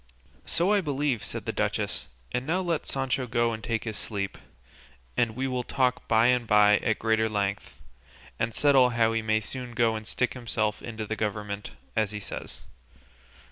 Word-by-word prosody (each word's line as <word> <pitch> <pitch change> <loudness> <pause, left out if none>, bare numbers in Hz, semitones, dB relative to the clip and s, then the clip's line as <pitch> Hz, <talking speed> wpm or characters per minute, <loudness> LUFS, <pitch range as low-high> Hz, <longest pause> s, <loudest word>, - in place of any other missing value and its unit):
"So 180 +5 +2
I 205 - +4
believe," 145 - 0
said - - -5
the - - -1
duchess; - - -1 0.2
"and 125 +2 -2
now 175 +4 +2
let 170 -4 -1
Sancho 135 -1 -1
go 120 0 +1
and 110 -1 -6
take 115 0 -1
his 110 -2 -4
sleep, 100 -3 -3 0.8
and 115 -2 +1
we 130 +2 -1
will 125 -1 -1
talk 125 0 0
by 110 +1 +4
and 125 -1 +3
by 105 0 +6
at 115 - 0
greater 110 0 +2
length, 100 -1 -2 0.6
and 115 - +1
settle 135 -1 +5
how 115 -2 +2
he 115 - +1
may 110 0 +1
soon 125 +2 -5
go 115 -1 +2
and 110 0 -6
stick 125 - 0
himself 110 -4 -1
into 110 -2 -5
the 110 - -3
government, 105 -1 -3 0.2
as 110 -2 +2
he 105 0 -5
says." 100 - -7
115 Hz, 180 wpm, -27 LUFS, 110-125 Hz, 0.8 s, by